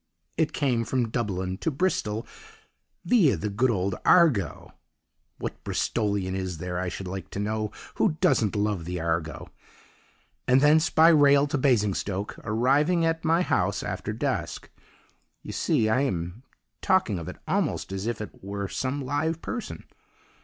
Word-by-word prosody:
It 160 -2 +1
came 125 -5 0
from 120 0 -1
Dublin 95 -6 -2
to - - 0
Bristol 130 - -1 0.8
viâ 165 - +4
the 105 +3 -3
good 120 +6 +2
old 100 -3 0
Argo 160 - +3 0.6
(what - - -6
Bristolian 100 -4 -1
is 95 -3 -3
there, 90 +2 -4
I 90 0 -2
should 95 +1 -6
like 95 +1 -6
to - - -6
know, 105 0 -2 0.2
who 165 -8 +1
doesn't 110 -7 +2
love 105 -4 -1
the 90 +1 -4
Argo!) 80 -1 -3 1.0
and 130 +1 +5
thence 155 +3 +4
by 160 +1 +6
rail 145 -3 +6
to 145 0 -1
Basingstoke, 105 -6 0
arriving 140 +10 +2
at 165 0 0
my 165 +2 +3
house - - 0
after - - -4
dusk. - - -3 0.7
You - - -7
see, 110 - +1
I 110 +5 +2
am 90 -5 -2 0.4
talking 185 - +2
of 85 - -7
it - - -7
almost - - -1
as 95 +2 -3
if 120 -2 -2
it 105 - -6
were 100 0 -4
some 130 +6 -3
live 155 +4 -1
person! 240 -3 -5
110 Hz, 155 wpm, -26 LUFS, 95-145 Hz, 1.0 s, by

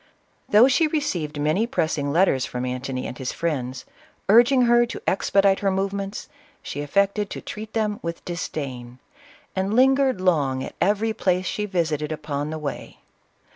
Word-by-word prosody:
Though 215 +5 +7
she 290 +4 +3
received 175 - -2
many 155 +10 +1
pressing 155 -8 -1
letters 155 -5 +3
from 125 0 -4
Antony 130 +1 -4
and - - -5
his 130 0 -4
friends, 130 -6 -3 0.4
urging 245 +4 +6
her 240 0 +5
to - - -7
expedite 195 0 +2
her 200 - +1
movements, 195 +1 -3 0.4
she 145 - -5
affected 200 +7 +1
to - - -6
treat 215 +1 -8
them 215 -2 -1
with 170 0 -6
disdain, 135 -8 -5 0.6
and 195 +3 -1
lingered 265 -2 +4
long 145 -8 +1
at - - -7
every 210 +4 +2
place 185 -3 0
she 210 +3 -2
visited 160 -5 -1
upon 150 -1 -3
the 160 - -4
way. 150 -2 -6
185 Hz, 155 wpm, -23 LUFS, 145-210 Hz, 0.6 s, Though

